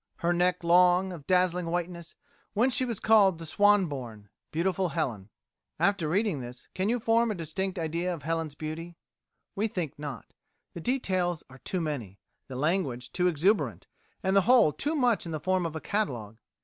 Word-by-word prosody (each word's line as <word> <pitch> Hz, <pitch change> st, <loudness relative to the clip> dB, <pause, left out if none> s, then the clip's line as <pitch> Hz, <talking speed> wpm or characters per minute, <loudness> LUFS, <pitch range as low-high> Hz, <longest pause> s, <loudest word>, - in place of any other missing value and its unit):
Her 175 Hz, 0 st, 0 dB
neck 180 Hz, 0 st, +1 dB
long, 180 Hz, +2 st, +4 dB
of 150 Hz, -5 st, -10 dB
dazzling 180 Hz, -1 st, +2 dB
whiteness, 170 Hz, 0 st, -4 dB, 0.4 s
whence 245 Hz, +5 st, +3 dB
she 260 Hz, -, +2 dB
was 235 Hz, -5 st, -3 dB
called 205 Hz, -5 st, +5 dB
the 165 Hz, -, -8 dB
swan 205 Hz, +3 st, +4 dB
born, 120 Hz, -, -7 dB, 0.2 s
beautiful 180 Hz, +3 st, 0 dB
Helen." 110 Hz, -8 st, -3 dB, 0.5 s
After 195 Hz, -6 st, +2 dB
reading 195 Hz, -3 st, +1 dB
this 125 Hz, 0 st, -9 dB
can 190 Hz, +2 st, -1 dB
you 245 Hz, +1 st, +1 dB
form 230 Hz, +1 st, +2 dB
a 215 Hz, -, -1 dB
distinct 185 Hz, +3 st, -3 dB
idea 170 Hz, +2 st, -1 dB
of 165 Hz, -5 st, -6 dB
Helen's 165 Hz, -1 st, -2 dB
beauty? 165 Hz, +3 st, -6 dB, 0.6 s
We 210 Hz, +3 st, +1 dB
think 165 Hz, -8 st, -4 dB
not. 145 Hz, -6 st, -7 dB, 0.4 s
The 170 Hz, -, -7 dB
details 185 Hz, -, 0 dB
are 130 Hz, -, -13 dB
too 185 Hz, +6 st, -3 dB
many, 125 Hz, -, -4 dB, 0.3 s
the 130 Hz, -, -8 dB
language 135 Hz, -5 st, -1 dB
too 180 Hz, 0 st, +1 dB
exuberant, 180 Hz, +6 st, +1 dB, 0.4 s
and 190 Hz, 0 st, +1 dB
the 195 Hz, -, +7 dB
whole 235 Hz, -12 st, +6 dB
too 300 Hz, +3 st, -2 dB
much 240 Hz, -, +2 dB
in -, -, -5 dB
the 155 Hz, -, -2 dB
form 185 Hz, +2 st, +1 dB
of 160 Hz, -, -8 dB
a -, -, -2 dB
catalogue. 120 Hz, -, -3 dB
175 Hz, 180 wpm, -28 LUFS, 155-195 Hz, 0.6 s, the